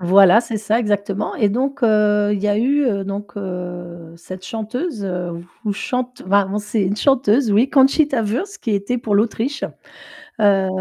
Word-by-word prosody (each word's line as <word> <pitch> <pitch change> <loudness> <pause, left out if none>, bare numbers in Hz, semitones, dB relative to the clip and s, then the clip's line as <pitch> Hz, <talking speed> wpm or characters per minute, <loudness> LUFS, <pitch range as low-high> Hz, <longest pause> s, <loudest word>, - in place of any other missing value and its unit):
Voilà, 190 +4 +6
c'est 225 -2 -4
ça 215 +2 0
exactement, 205 -2 -1
et 210 - +2
donc 265 +5 -2
heu, 210 -2 +3
il 205 - 0
y 210 - -1
a 205 0 +2
eu, 280 +6 +2
heu, 200 -5 0
donc 200 +2 -6
heu, 175 -3 -7
cette 185 +2 -10
chanteuse, 225 - -4 0.6
ou 205 - 0
chante 250 +4 -4
enfin, 195 +1 +2
on 210 - -1
c'est 210 +1 -2
une 190 +1 0
chanteuse 250 -1 +2
oui, 220 +6 +3
Conchita 275 -2 +3
Wurst, 260 - -3
qui 230 - -4
était 200 +5 -2
pour 220 -4 0
l'Autriche. 230 +6 -1 0.8
Heu 195 -2 +4
210 Hz, 170 wpm, -19 LUFS, 200-245 Hz, 0.8 s, Voilà